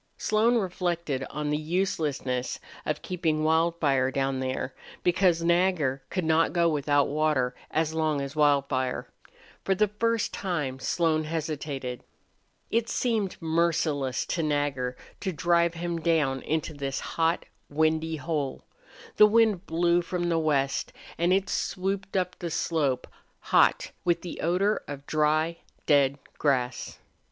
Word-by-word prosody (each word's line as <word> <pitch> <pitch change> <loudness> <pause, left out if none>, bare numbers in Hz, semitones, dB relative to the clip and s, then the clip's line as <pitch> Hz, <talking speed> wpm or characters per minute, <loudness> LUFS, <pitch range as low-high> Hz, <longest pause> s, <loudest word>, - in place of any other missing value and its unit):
Slone 220 +3 +2
reflected 175 - -2
on 150 0 -3
the 150 - +1
uselessness 155 -7 -1 0.3
of 150 - -2
keeping 160 -4 -1
Wildfire 160 -5 +2
down 135 0 -1
there, 130 0 -3 0.3
because 175 -2 +3
Nagger 170 -6 +2
could 185 - -2
not 160 +1 +3
go 170 -1 +3
without 145 -2 +2
water 145 -4 +1 0.2
as 160 0 0
long 155 -2 +1
as 140 +1 -5
Wildfire. 140 -3 +1 0.6
For 195 - +1
the 210 +1 +2
first 230 +2 0
time 150 -9 -2
Slone 155 +2 +1
hesitated. 150 -5 -4 0.7
It 230 0 +1
seemed 220 -6 -1
merciless 160 -5 0
to 170 - -1
Nagger 145 -4 -1 0.2
to 190 - -2
drive 170 +1 +2
him 170 0 -3
down 155 -5 +1
into 155 0 -2
this 140 -2 -3
hot, 165 +1 0 0.2
windy 160 +2 +1
hole. 145 -2 -3 0.5
The 210 - +9
wind 215 -4 +3
blew 170 +1 +2
from 175 0 -2
the 165 -1 +2
west, 140 -4 0 0.3
and 170 +2 +2
it 195 +1 +2
swooped 195 0 -2
up 180 -1 -2
the 170 - -3
slope, 145 -6 0 0.3
hot, - - +3
with 170 -1 +1
the 175 - -6
odor 190 +6 +1
of 145 -1 -7
dry, 155 +2 +1 0.3
dead 140 -2 +4 0.2
grass. 125 -4 0
160 Hz, 135 wpm, -27 LUFS, 145-175 Hz, 0.7 s, The